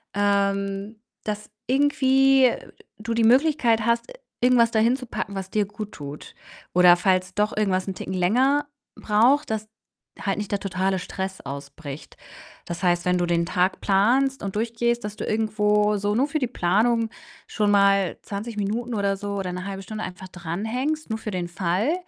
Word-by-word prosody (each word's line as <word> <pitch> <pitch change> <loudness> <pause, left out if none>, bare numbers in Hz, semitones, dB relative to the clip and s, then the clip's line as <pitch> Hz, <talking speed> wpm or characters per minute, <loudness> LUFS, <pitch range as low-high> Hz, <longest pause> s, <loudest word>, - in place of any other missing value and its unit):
ähm, 200 +1 0 0.3
dass 210 0 -4 0.2
irgendwie 270 -2 +4 0.5
du 230 +2 -3
die 230 0 +1
Möglichkeit 245 -4 +3
hast, 235 - 0 0.3
irgendwas 240 -2 +4
da 220 - +2
hinzupacken, 235 -3 -1
was 190 -1 -5
dir 210 -1 +1
guttut. 170 -9 -8 0.4
Oder 180 0 +7
falls 185 0 +1
doch 210 +1 0
irgendwas 190 -3 +1
'n 190 - -2
Ticken 190 - -6
länger 260 +11 +2 0.3
braucht, 240 +8 +3
dass 215 0 -3 0.5
halt 195 0 -1
nicht 210 - -5
der 200 - 0
totale 190 0 -1
Stress 190 +2 -5
ausbricht. 140 +1 -8 0.5
Das 175 +2 -6
heißt, 175 -1 +2
wenn 180 0 +2
du 175 - +1
den 170 0 +1
Tag 180 +1 0
planst 245 +7 +2
und 195 0 -4
durchgehst, 235 +1 0
dass 210 0 -5
du - - -4
irgendwo 210 -1 +1
so 205 +1 -1
nur 270 +4 +2
für 310 - -1
die 255 - 0
Planung 225 +3 +1 0.4
schon 210 -1 0
mal 200 -2 +3
20 210 +3 -5
Minuten 225 +4 -2
oder 200 -1 0
so 200 0 -4
oder 185 -2 -3
'ne 185 +1 -5
1/2 195 -1 -5
Stunde 215 +2 -6
einfach 185 0 -9
dran 175 +2 -5
hängst, 275 +6 -2
nur 220 0 -2
für 215 - -5
den 175 -2 -3
Fall, 185 - 0
210 Hz, 170 wpm, -24 LUFS, 190-235 Hz, 0.5 s, Oder